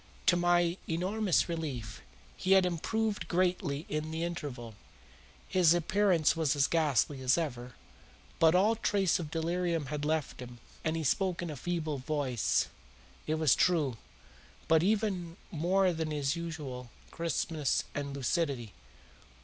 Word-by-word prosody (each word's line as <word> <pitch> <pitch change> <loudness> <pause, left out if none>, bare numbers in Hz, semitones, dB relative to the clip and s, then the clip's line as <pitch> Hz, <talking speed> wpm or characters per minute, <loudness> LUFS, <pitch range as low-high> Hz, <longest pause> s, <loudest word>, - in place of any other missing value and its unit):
To 180 - +5
my 175 0 +2
enormous 185 +3 +1
relief, 135 - -5 0.3
he 190 - +2
had 190 -1 +6
improved 210 +5 -1
greatly 175 -4 0
in 155 +1 -3
the 160 +1 -3
interval. 140 -9 -5 0.7
His 175 -3 +4
appearance 175 -1 +2
was 160 -3 +1
as 140 -1 +3
ghastly 145 -4 +1
as 130 +3 +3
ever, 125 -7 -4 0.6
but 165 +1 +5
all 210 +5 +4
trace 200 -5 +1
of 160 -4 -5
delirium 165 -2 -1
had 150 -1 -3
left 155 -1 -1
him 120 -1 -9 0.3
and 160 +1 0
he 160 - -2
spoke 180 +4 0
in 170 - -4
a - - -6
feeble 155 -1 -3
voice, 130 -4 0 0.6
it 155 - +1
is 155 -6 +5
true, 155 -9 +2 0.7
but 160 - +5
with 185 - +3
even 195 -6 -1
more 180 +3 +2
than 160 -1 -3
his 145 0 -1
usual 150 -7 -6 0.2
crispness 160 -3 -1
and 140 -1 -4
lucidity. 135 - -1
160 Hz, 140 wpm, -31 LUFS, 145-175 Hz, 0.7 s, had